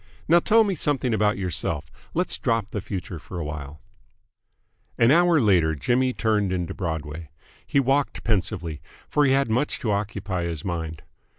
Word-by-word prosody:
Now 170 +2 +6
tell 225 +6 +4
me 200 -2 0
something 145 -6 0
about 105 0 +2
yourself. 80 -4 -2 0.2
Let's 180 +2 +1
drop 115 -3 0
the 105 - -3
future 90 -3 -5
for 90 - -9
awhile." 75 -2 -6 1.2
An 115 +2 +5
hour 170 +1 +5
later 90 - +3
Jimmy 125 - +1
turned 105 -5 0
into 90 -2 -2
Broadway. 80 -2 -5 0.4
He 140 - +2
walked 135 +1 +1
pensively, 90 -7 -1 0.3
for 150 - +2
he 135 - +4
had 135 0 +2
much 125 +6 +1
to 115 -6 0
occupy 100 -3 -2
his 85 -3 -5
mind. 80 -4 -4
100 Hz, 160 wpm, -24 LUFS, 85-130 Hz, 1.2 s, Now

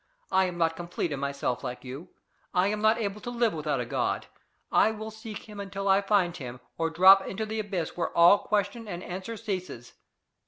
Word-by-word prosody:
I 190 0 +4
am 180 -1 -4
not 165 -1 +1
complete 170 -1 -3
in 140 - -3
myself 140 -3 -2
like 125 - -5
you. 135 +7 -8 0.5
I 180 +2 +4
am 210 0 -2
not 220 +1 +4
able 210 -2 -3
to 240 - -5
live 235 -2 +1
without 150 -3 -1
a 120 - -2
God. 115 - -1 0.5
I - - +5
will 220 0 -6
seek 220 0 -9
him 210 -1 -9
until 195 0 -4
I 195 +1 +5
find 195 -4 +2
him, 125 -2 -7 0.2
or 165 0 0
drop 190 +4 +7
into 220 +3 -3
the 220 +1 -3
abyss 195 -6 -3
where 175 - -1
all 175 +4 +8
question 215 +2 -1
and 175 -2 -5
answer 190 +5 -6
ceases. 185 - -5
190 Hz, 205 wpm, -28 LUFS, 165-210 Hz, 0.5 s, all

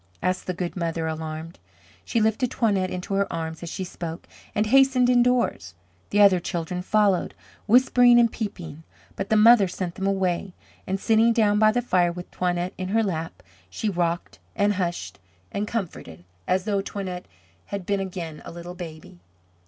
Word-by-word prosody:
asked 185 0 -1
the 185 - -1
good 175 -1 -4
mother 165 -2 -2
alarmed. 160 +1 -5 0.4
She 230 - 0
lifted 220 +4 +1
Toinette 200 -7 +1
into 180 +2 -5
her 200 0 0
arms 160 -1 -4
as 170 - -6
she 190 - -4
spoke, 170 -2 -7 0.3
and 210 - +2
hastened 255 +1 +4
indoors. 245 - +1 0.3
The 205 - +3
other 195 -3 +6
children 175 +1 -3
followed, 200 -1 +1 0.3
whispering 245 +1 +6
and 235 -1 +4
peeping, 170 -8 -6 0.3
but 195 - -4
the 220 - +3
mother 215 -1 +7
sent 180 -1 -4
them 190 +2 -3
away, 190 -1 -1 0.3
and 190 +1 -1
sitting 225 +2 +3
down 210 -2 +3
by 215 0 +5
the 245 +2 0
fire 180 -6 +2
with 180 +1 -9
Toinette 180 0 -1
in 185 - -3
her 225 +3 +2
lap, 165 -5 -4 0.3
she 215 - -2
rocked 175 -2 -2 0.2
and 205 0 +2
hushed 175 -3 -3 0.3
and 205 +1 -2
comforted, 160 - -5 0.2
as 185 +1 +1
though 200 -2 0
Toinette 190 -3 -6 0.4
had 200 -3 -5
been 200 +1 0
again 175 -5 -5
a - - -9
little 175 +1 -8
baby. 160 - -10
190 Hz, 170 wpm, -24 LUFS, 175-215 Hz, 0.4 s, mother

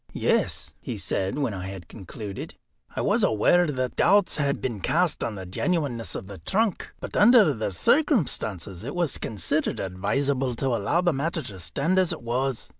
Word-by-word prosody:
"Yes," - - 0
he - - -5
said, 95 +6 -1
when 135 -7 -1
I 95 -1 -5
had 95 -3 -8
concluded, 105 0 -8 0.4
"I - - -1
was - - +2
aware 175 +11 +4
that 130 -4 -2
doubts 200 -1 +3
had 140 -2 0
been 120 -5 -3
cast 170 - +1
on 110 - -3
the 95 -2 -7
genuineness 120 - -2
of - - -5
the 95 -1 -10
trunk. 205 - -1
But - - -7
under 210 - +6
the 110 -4 -3
circumstances 110 - +1
it 140 +7 -5
was 175 -5 0
considered 105 -5 -1
advisable 130 +8 -1
to 135 +3 -1
allow 120 - +1
the 175 -2 +2
matter 155 +3 -2
to 95 -3 -9
stand 155 - 0
as 185 -3 +2
it - - -5
was. 125 +1 -1
130 Hz, 180 wpm, -25 LUFS, 100-170 Hz, 0.4 s, under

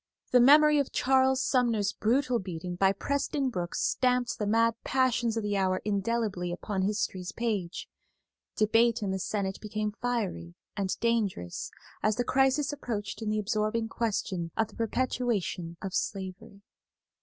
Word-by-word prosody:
The 250 - +6
memory 300 +4 +7
of 280 - -1
Charles 265 0 +3
Sumner's 230 -6 +1
brutal 250 +2 +1
beating 180 -2 -5
by 190 +2 +4
Preston 280 +5 -1
Brooks 175 -4 -3
stamped 250 -1 +1
the 210 - -1
mad 230 +2 +3
passions 245 -3 +1
of 225 - -1
the 205 -1 -1
hour 185 -1 +1
indelibly 200 -3 -1
upon 190 +2 -3
history's 195 -2 -1
page. 205 -6 -3 0.7
Debate 225 +1 +3
in 195 - -1
the 190 - -2
Senate 190 0 -2
became 215 0 -2
fiery 200 - -2 0.2
and 200 -2 -2
dangerous 215 - -1 0.3
as 215 0 +2
the 245 - 0
crisis 270 +3 +2
approached 225 -7 -4
in 220 - -2
the 215 - 0
absorbing 215 +2 -1
question 195 -7 -2
of 225 -1 +1
the - - -17
perpetuation 225 -7 -1
of 190 -1 -4
slavery. 200 +2 -4
215 Hz, 145 wpm, -29 LUFS, 195-245 Hz, 0.7 s, memory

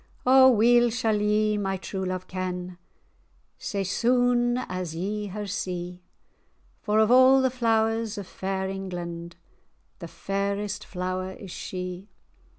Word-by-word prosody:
"O 260 +1 +7
weel 240 +1 +5
sall 220 -2 0
ye 210 0 +2
my 195 -1 -1
true 190 0 -5
love 185 0 -3
ken, 180 -1 -5 0.8
Sae 200 -5 -3
sune[#] 245 +4 +2
as 180 -3 -4
ye 205 +4 -3
her 205 +2 -5
see; 180 -2 -4 0.8
For, 210 0 0
of 220 +1 +4
a' 260 +1 +7
the 260 - +2
flowers 225 -2 0
of 200 - -5
fair 190 +1 -3
England, 175 -3 -6 0.6
The 170 - -7
fairest 200 +3 -3
flower 185 0 -3
is 190 -1 -10
she. 180 +2 -6
200 Hz, 130 wpm, -26 LUFS, 185-225 Hz, 0.8 s, O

